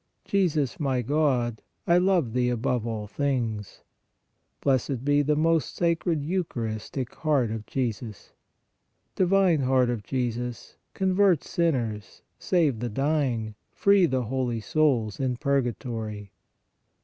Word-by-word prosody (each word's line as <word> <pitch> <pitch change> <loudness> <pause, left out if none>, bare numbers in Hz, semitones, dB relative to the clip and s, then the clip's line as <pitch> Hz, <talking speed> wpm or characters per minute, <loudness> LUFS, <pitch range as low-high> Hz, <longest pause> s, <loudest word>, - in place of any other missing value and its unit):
Jesus, 160 - 0
my 135 -4 0
God, 125 -5 +1 0.2
I 170 +1 +4
love 180 -10 +2
Thee 125 0 +1
above 120 -1 -1
all 110 -2 -3
things. 115 -4 -3 0.8
Blessed 130 -1 0
be 145 0 +4
the 150 +1 +1
most 160 +1 +1
Sacred 170 -2 0
Eucharistic 130 - -3
Heart 140 -8 +1
of 110 -1 -5
Jesus! 115 -5 -4 0.8
Divine 185 -3 +3
Heart 130 -2 +2
of 120 -3 -3
Jesus, 120 0 -4 0.2
convert 190 -3 +3
sinners, 120 -11 -2 0.2
save 155 - +1
the 120 +1 -2
dying, 130 -4 0 0.2
free 200 -3 +4
the 130 -3 0
holy 120 -1 -2
souls 115 -3 +1
in 130 -2 -1
purgatory. 115 -6 -2
130 Hz, 115 wpm, -26 LUFS, 115-155 Hz, 0.8 s, I